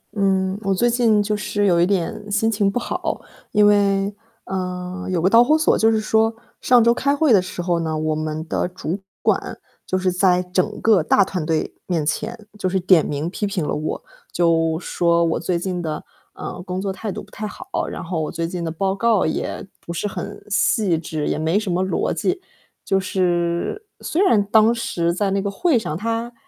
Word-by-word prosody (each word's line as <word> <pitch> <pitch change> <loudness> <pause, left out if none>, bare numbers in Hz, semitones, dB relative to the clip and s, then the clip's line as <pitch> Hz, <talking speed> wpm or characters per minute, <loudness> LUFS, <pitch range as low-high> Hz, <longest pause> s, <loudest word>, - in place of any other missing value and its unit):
嗯， 190 -1 +1
我 195 -1 0
最 240 +6 +2
近 225 -4 +3
就 210 0 -1
是 205 0 -1
有 170 -3 +4
一 - - +5
点 200 +2 -2
心 215 +2 +2
情 205 -2 +2
不 225 - -2
好， - - -3 0.3
因 210 0 +4
为， 200 -1 +3 0.3
呃， 180 -1 -4
有 180 -2 0
个 170 - +2
导 230 +3 +7
火 305 +5 +4
索， 315 - +3
就 225 0 +4
是 220 - +2
说 220 +1 +2 0.3
上 245 -2 +5
周 235 0 +5
开 280 +3 +1
会 290 -5 +3
的 195 - +6
时 185 -1 -6
候 175 -1 +1
呢， 160 -1 -2
我 155 0 0
们 155 +1 -4
的 175 - -1
主 180 0 -4 0.2
管 - - 0 0.3
就 185 - 0
是 185 0 +1
在 180 0 +3
整 180 0 -1
个 215 -6 +4
大 195 +5 +4
团 185 -3 -3
队 160 0 -1
面 165 -5 0
前， 215 +7 -3
就 185 - 0
是 190 - +1
点 180 -3 +5
名 150 +2 -3
批 200 +3 -2
评 185 -6 -2
了 - - -1
我， 155 +1 -3 0.3
就 165 -2 +2
说 170 -1 +1
我 165 - 0
最 175 +1 -1
近 180 0 -3
的， 155 -2 -4 0.3
呃， - - -7
工 180 +1 -4
作 195 0 -2
态 205 +2 -5
度 - - -6
不 - - -19
太 215 0 -5
好， - - -10 0.2
然 - - -6
后 165 -1 -2
我 155 - -3
最 165 0 -2
近 175 0 -4
的 165 - -2
报 190 +4 -1
告 220 0 +2
也 160 - -3
不 - - -8
是 170 +4 -2
很 205 0 -7
细 205 -2 +2
致， 155 -2 -3
也 - - -1
没 160 +5 +1
什 210 -4 -3
么 180 +2 +1
逻 190 -2 0
辑。 200 - -1 0.5
就 195 - +2
是， 180 - -1
虽 335 - -1
然 225 - +4
当 220 +3 +4
时 170 -7 -1
在 195 +3 0
那 195 0 +1
个 200 - -2
会 255 - +2
上 155 -7 -4
他， 230 +3 -3
190 Hz, 230 characters per minute, -21 LUFS, 170-210 Hz, 0.5 s, 导